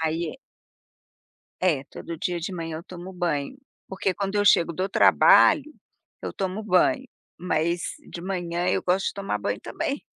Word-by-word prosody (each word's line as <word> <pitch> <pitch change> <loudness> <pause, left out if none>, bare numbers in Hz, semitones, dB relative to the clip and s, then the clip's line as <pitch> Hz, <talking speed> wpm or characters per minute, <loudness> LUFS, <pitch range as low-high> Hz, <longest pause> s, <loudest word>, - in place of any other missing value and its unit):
aí 165 +8 -2 1.2
É 160 -7 +2
todo 170 +4 -8
dia 175 +2 -2
de 170 +4 -4
manhã 165 -2 -4
eu 165 - -9
tomo 180 +1 -9
banho, 175 - -2 0.3
porque 190 0 -1
quando 200 +1 -3
eu 205 0 +2
chego 170 -4 +5
do 185 +4 -1
trabalho, 310 - +5 0.5
eu - - -4
tomo 195 +2 -3
banho, 255 - +3 0.3
mas 170 0 0 0.3
de 170 - -7
manhã 175 -1 -2
eu 185 - +1
gosto 185 +2 +1
de - - -2
tomar 195 - -3
banho 100 0 -2
também. - - -3
180 Hz, 160 wpm, -25 LUFS, 170-195 Hz, 1.2 s, chego